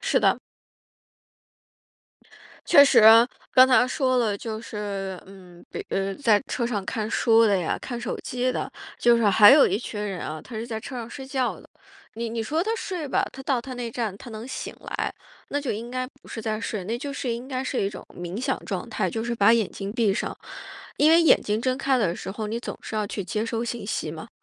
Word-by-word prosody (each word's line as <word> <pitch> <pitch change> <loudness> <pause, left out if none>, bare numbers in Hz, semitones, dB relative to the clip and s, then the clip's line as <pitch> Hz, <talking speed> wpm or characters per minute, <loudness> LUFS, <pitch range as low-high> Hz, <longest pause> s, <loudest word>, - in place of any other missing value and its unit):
是 - - +1
的。 - - +3 2.3
确 285 - +8
实， 275 - +5 0.5
刚 255 0 +8
才 255 -1 +5
说 255 -1 +1
了， 215 -4 +1
就 220 0 -5
是， 200 -4 -5
嗯， 185 -3 -15
比 - - -6
呃， 195 0 -1
在 220 -6 +3
车 245 - -2
上 210 -5 -2
看 215 +2 -3
书 230 -1 +4
的 205 -3 +3
呀， 175 - -1
看 240 -2 -5
手 240 - -3
机 250 +1 -1
的， - - -3 0.3
就 240 0 +5
是 230 - +1
还 205 +1 +8
有 280 +1 +7
一 190 - 0
群 215 -1 -6
人 195 -3 -4
啊， 155 0 -5
他 245 - -11
是 220 +1 -3
在 225 -2 -4
车 255 - -8
上 230 -2 -5
睡 270 -2 -8
觉 265 -2 -1
的。 - - -18 0.5
你 230 +1 -3
你 230 0 -3
说 310 +9 0
他 430 - -2
睡 360 -9 -4
吧， - - +1
他 270 - -9
到 265 -2 0
他 255 +2 -8
那 245 -2 -4
站 225 -4 -3
他 240 - -11
能 220 +1 -7
醒 260 - -5
来， - - -3 0.4
那 285 - -1
就 280 - -2
应 230 +3 -6
该 255 0 -2 0.2
不 - - -16
是 225 - -6
在 215 -1 -2
睡， 215 -4 -4
那 225 +5 -2
就 280 +3 -5
是 260 -3 -2
应 240 +3 -6
该 260 -1 -3
是 260 - -1
一 195 - 0
种 - - -9
冥 175 +4 -5
想 265 +1 0
状 195 +2 -4
态， 210 -5 -1
就 225 +3 -3
是 240 0 -2
把 225 0 +5
眼 225 -4 +2
睛 195 0 -6
闭 220 -4 +2
上。 - - -3 0.6
因 300 +2 +5
为 330 +1 +7
眼 325 - +5
睛 210 +1 -1
睁 255 +1 0
开 270 -1 +1
的 185 -7 +1
时 - - -6
候， 215 +2 -4
你 225 +3 -3
总 - - -6
是 - - -8
要 215 -1 0
去 200 -1 -4
接 210 +4 -2
收 230 0 -2
信 235 -2 -4
息 160 -6 -2
嘛， 160 0 -9
230 Hz, 250 characters per minute, -25 LUFS, 205-255 Hz, 2.3 s, 确